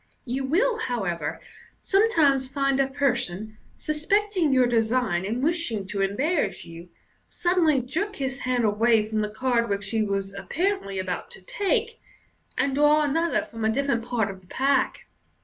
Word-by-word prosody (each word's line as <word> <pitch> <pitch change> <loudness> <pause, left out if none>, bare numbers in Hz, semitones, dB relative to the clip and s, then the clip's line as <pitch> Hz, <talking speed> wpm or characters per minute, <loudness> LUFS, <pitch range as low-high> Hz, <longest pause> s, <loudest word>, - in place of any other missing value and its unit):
You 260 +2 -2
will, 445 - +1
however, 180 - -2 0.4
sometimes 310 - +2
find 275 -1 +1
a 270 - +3
person, 235 -7 -1 0.2
suspecting 355 +2 0
your 260 -1 +4
design 225 -5 +1
and 235 +5 -2
wishing 300 - 0
to 200 -1 -2
embarrass 270 - 0
you, 170 +1 -11 0.4
suddenly 340 -6 +2
jerk 370 - -3
his 270 -2 -3
hand 250 -2 0
away 220 +1 +3
from 215 0 -2
the 210 - -1
card 235 +1 0
which 200 -1 -2
he 225 -1 +1
was 195 -2 -2
apparently 200 - -2
about 185 -1 -3
to - - -13
take, 445 - -1 0.6
and 275 - +1
draw 295 +2 +4
another 325 +3 +1
from 225 -1 -8
a 220 - +3
different 255 -1 0
part 230 -4 -1
of 190 -1 -12
the 180 - -20
pack. 275 +7 0
255 Hz, 155 wpm, -25 LUFS, 215-305 Hz, 0.6 s, your